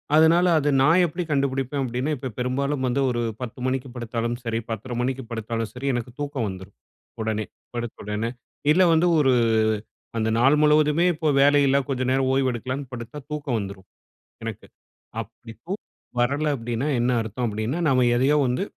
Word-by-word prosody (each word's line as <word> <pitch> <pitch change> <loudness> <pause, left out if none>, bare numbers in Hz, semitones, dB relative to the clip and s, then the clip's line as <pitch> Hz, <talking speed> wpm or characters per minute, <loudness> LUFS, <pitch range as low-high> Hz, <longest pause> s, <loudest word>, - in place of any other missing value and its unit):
அதனால 165 +3 +6
அத 145 0 +1
நான் 165 +6 +5
எப்படி 175 +2 -3
கண்டுபிடிப்பேன் 135 -1 0
அப்பிடின்னா, 125 +4 -2
இப்ப 130 0 -5
பெரும்பாலும் 130 +2 -1
வந்து 125 +3 +1
ஒரு 120 -1 -1 0.2
10 125 0 -6
மணிக்கு 130 0 -2
படுத்தாலும் 120 0 -2
சரி, 115 -1 -1
10.30 115 +3 -4
மணிக்கு 130 +1 -2
படுத்தாலும் 115 0 -3
சரி, 125 +3 -5
எனக்கு 120 0 -3
தூக்கம் 140 -6 -2
வந்துரும். 95 +1 -9 0.5
உடனே 110 -1 -1 0.3
படுத்த 120 -1 -4
உடனே. 105 +2 -2 0.4
இல்ல 185 +3 +5
வந்து 165 +2 +4
ஒரு 135 -3 +4 0.9
அந்த 110 0 +1
நாள் 135 +5 +5
முழுவதுமே 150 +2 +4
இப்போ 155 0 -2
வேலை 145 +1 +6
இல்ல. 135 - +4
கொஞ்ச 130 -2 -1
நேரம் 130 0 +2
ஓய்வு 135 -1 +2
எடுக்கலான்னு 130 +3 -5
படுத்தா, 120 +4 -7
தூக்கம் 145 -5 -2
வந்துரும் 100 -2 -7 0.6
எனக்கு. - - -6 0.5
அப்படி 115 - -10
தூ 180 - -5 0.5
வரல 140 +5 +1
அப்பிடின்னா 120 +2 -2
என்ன 120 +1 +2
அர்த்தம். 110 +3 -4
அப்பிடின்னா, 110 +7 -2
நம்ம 130 -1 +3
எதையோ 135 +4 +3
வந்து 125 +10 0
130 Hz, 165 wpm, -24 LUFS, 115-145 Hz, 0.9 s, அதனால